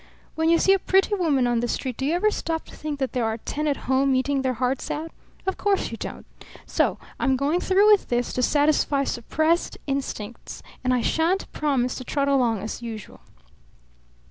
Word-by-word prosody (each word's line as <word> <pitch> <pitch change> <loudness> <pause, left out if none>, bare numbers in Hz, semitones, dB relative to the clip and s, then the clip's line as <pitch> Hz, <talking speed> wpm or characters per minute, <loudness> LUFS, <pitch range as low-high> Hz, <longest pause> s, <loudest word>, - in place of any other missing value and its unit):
When 320 0 +1
you 335 - +5
see 385 - +4
a 390 - +2
pretty 385 +3 +2
woman 310 -10 +2
on 240 -1 +1
the 240 - -1
street 255 +1 -3
do 270 - -1
you 320 - +1
ever 425 +4 +2
stop 325 -5 -3
to - - -13
think 300 -1 -4
that 265 -2 -2
there 250 - 0
are 225 0 -1
ten 300 +6 -3
at 285 - -2
home 265 +1 +2
eating 270 +1 +1
their 260 -1 -1
hearts 255 +2 -1
out? 320 +2 -4 0.3
Of 380 - -1
course 400 -1 +1
you - - -5
don't. - - -7 0.4
So - - +1 0.2
I'm 265 - +2
going 290 +6 +1
through 395 +3 +4
with 415 - +4
this, 245 0 0
to 255 - -1
satisfy 290 0 +2
suppressed 315 +7 0
instincts; 265 -5 -5 0.2
and 255 - +1
I 250 -1 +2
shan't 335 +9 0
promise 265 -5 0
to 255 - -6
trot 280 +2 0
along 240 -7 +2
as 220 - -5
usual." 225 -3 -8
275 Hz, 200 wpm, -24 LUFS, 250-325 Hz, 0.4 s, you